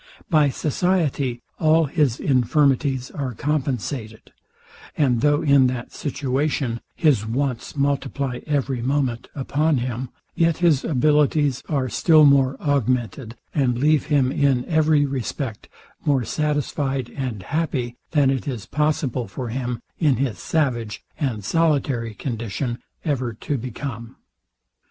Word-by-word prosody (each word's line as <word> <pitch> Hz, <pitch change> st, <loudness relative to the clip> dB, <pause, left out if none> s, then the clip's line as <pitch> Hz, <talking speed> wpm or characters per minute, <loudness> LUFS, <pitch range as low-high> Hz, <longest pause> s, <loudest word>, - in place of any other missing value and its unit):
By 150 Hz, -3 st, +5 dB
society 145 Hz, -5 st, 0 dB, 0.2 s
all 160 Hz, 0 st, +4 dB
his 140 Hz, -5 st, +1 dB
infirmities 135 Hz, 0 st, +2 dB
are 130 Hz, -5 st, -4 dB
compensated; 130 Hz, -6 st, -3 dB, 0.7 s
and 125 Hz, -6 st, +2 dB
though 145 Hz, +1 st, +3 dB
in 140 Hz, -3 st, +5 dB
that 125 Hz, -1 st, -4 dB
situation 135 Hz, -3 st, -1 dB
his 145 Hz, -10 st, +3 dB
wants 125 Hz, +2 st, -2 dB
multiply 140 Hz, -2 st, -1 dB
every 140 Hz, -4 st, 0 dB
moment 130 Hz, -2 st, -1 dB
upon 150 Hz, +2 st, +1 dB
him, 125 Hz, 0 st, -3 dB, 0.2 s
yet 165 Hz, -2 st, +2 dB
his 165 Hz, -6 st, +3 dB
abilities 150 Hz, -1 st, +2 dB
are 140 Hz, -4 st, 0 dB
still 155 Hz, -, +5 dB
more 135 Hz, -2 st, +4 dB
augmented, 125 Hz, -4 st, -1 dB, 0.2 s
and 130 Hz, -5 st, +1 dB
leave 150 Hz, +2 st, +2 dB
him 140 Hz, -4 st, +2 dB
in 135 Hz, -4 st, +2 dB
every 155 Hz, -2 st, +3 dB
respect 130 Hz, -3 st, -4 dB, 0.3 s
more 140 Hz, -4 st, +2 dB
satisfied 145 Hz, -3 st, -1 dB
and 125 Hz, -8 st, -4 dB
happy, 135 Hz, -, -2 dB
than 145 Hz, -4 st, +3 dB
it 135 Hz, 0 st, -2 dB
is 120 Hz, -7 st, -4 dB
possible 140 Hz, -4 st, -1 dB
for 125 Hz, -3 st, -5 dB
him, 120 Hz, -1 st, -3 dB, 0.2 s
in 150 Hz, -6 st, +3 dB
his 125 Hz, -3 st, -2 dB
savage 120 Hz, -10 st, -1 dB, 0.2 s
and 115 Hz, -9 st, -2 dB
solitary 140 Hz, -8 st, +1 dB
condition, 120 Hz, 0 st, -3 dB, 0.3 s
ever 130 Hz, -6 st, -1 dB
to 140 Hz, +6 st, -3 dB
become. 120 Hz, -1 st, -6 dB
135 Hz, 125 wpm, -22 LUFS, 125-150 Hz, 0.7 s, By